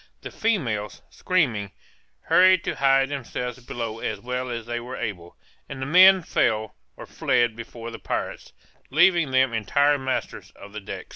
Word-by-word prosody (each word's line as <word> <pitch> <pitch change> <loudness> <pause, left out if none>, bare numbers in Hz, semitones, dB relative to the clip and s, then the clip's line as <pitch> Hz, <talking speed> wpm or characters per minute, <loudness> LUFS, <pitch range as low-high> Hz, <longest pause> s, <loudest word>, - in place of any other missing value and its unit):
The - - -7
females, 120 - -2
screaming, 120 - -1 0.5
hurried 185 -1 +4
to - - -2
hide 135 -1 +3
themselves 125 -3 -5
below 115 -2 -5
as 110 -3 -4
well 125 +3 -4
as 115 -2 -5
they 120 0 -3
were 125 +2 -8
able, 90 -7 -6 0.3
and 135 - -7
the 130 - -3
men 185 +4 +6
fell 110 -7 0 0.2
or - - -9
fled 120 -2 0
before 115 0 -9
the 115 - -9
pirates, - - -5 0.4
leaving 170 +1 +3
them 130 -2 +2
entire 140 +6 +2
masters 130 0 -4
of 100 +1 -13
the 110 - -5
decks. - - -8
125 Hz, 160 wpm, -24 LUFS, 115-145 Hz, 0.5 s, men